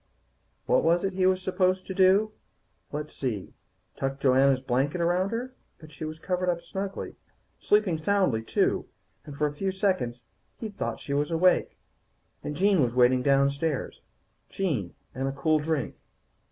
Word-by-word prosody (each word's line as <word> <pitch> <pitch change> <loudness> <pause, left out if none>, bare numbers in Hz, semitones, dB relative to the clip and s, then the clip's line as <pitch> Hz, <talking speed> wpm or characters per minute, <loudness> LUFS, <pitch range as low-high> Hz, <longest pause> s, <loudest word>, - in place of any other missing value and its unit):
What - - +3
was 170 +2 +3
it 195 0 -1
he 185 0 +2
was 185 0 +1
supposed 185 0 +1
to 190 - -5
do? 195 +3 +4 0.6
Let's 150 +1 -5
see 115 -8 -4 0.4
Tuck 135 0 -3
Joanna's 135 0 +4
blanket 135 +6 0
around 175 +3 +1
her. 245 +4 -4 0.2
But 155 -2 -14
she 155 +2 -7
was 155 0 -6
covered 180 +2 -1
up 170 -1 0
snugly. 195 +3 -6 0.4
Sleeping 205 -6 +2
soundly, 170 - +1
too, 110 - 0 0.4
and 145 -2 -9
for 150 - +1
a 150 - 0
few 190 +6 -2
seconds 185 - -1 0.3
he'd 215 -3 -7
thought - - -3
she 140 - -4
was 145 +1 0
awake. 175 +2 +2 0.7
And 150 - -4
Jean 195 +1 +3
was 120 -2 0
waiting 125 0 +4
downstairs, 140 +2 +1 0.5
Jean 140 - -2 0.2
and 135 +1 -2
a - - -1
cool 155 +3 +1
drink. 150 -4 -2
160 Hz, 160 wpm, -27 LUFS, 140-185 Hz, 0.7 s, do